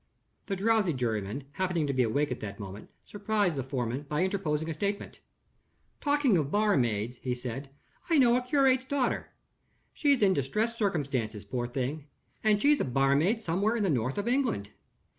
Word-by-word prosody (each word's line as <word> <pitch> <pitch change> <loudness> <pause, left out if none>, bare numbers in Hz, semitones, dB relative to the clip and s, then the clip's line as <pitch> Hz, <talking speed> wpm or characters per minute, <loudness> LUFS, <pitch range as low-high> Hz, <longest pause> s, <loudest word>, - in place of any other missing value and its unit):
The 195 - -1
drowsy 205 -3 +2
juryman, 115 -1 -2
happening 180 0 -1
to 140 - -1
be 130 - +2
awake 130 +5 +1
at 125 - -3
that 100 -1 -7
moment, 100 0 -8 0.2
surprised 205 -4 0
the 135 - -1
foreman 130 +1 -3
by 150 +4 +1
interposing 165 -5 -1
a 165 - -2
statement. 200 +6 -3 0.8
"Talking 285 - +3
of 145 -3 -1
barmaids," 125 - +1
he 125 0 -3
said, 125 +3 -6 0.4
"I 330 - +4
know 245 -3 +5
a 250 - +2
curate's 260 0 +3
daughter. 270 -2 -1 0.6
She's 280 -6 +2
in 190 -2 +5
distressed 210 - -1
circumstances, 135 - -1
poor 120 +3 -3
thing; 135 +4 -3 0.4
and 215 -1 +4
she's 290 +5 +4
a - - +2
barmaid 140 - +2
somewhere 200 +7 +1
in 225 - 0
the 190 - +2
north 130 0 -1
of 205 +2 -2
England. 240 - 0
160 Hz, 170 wpm, -29 LUFS, -, 0.8 s, know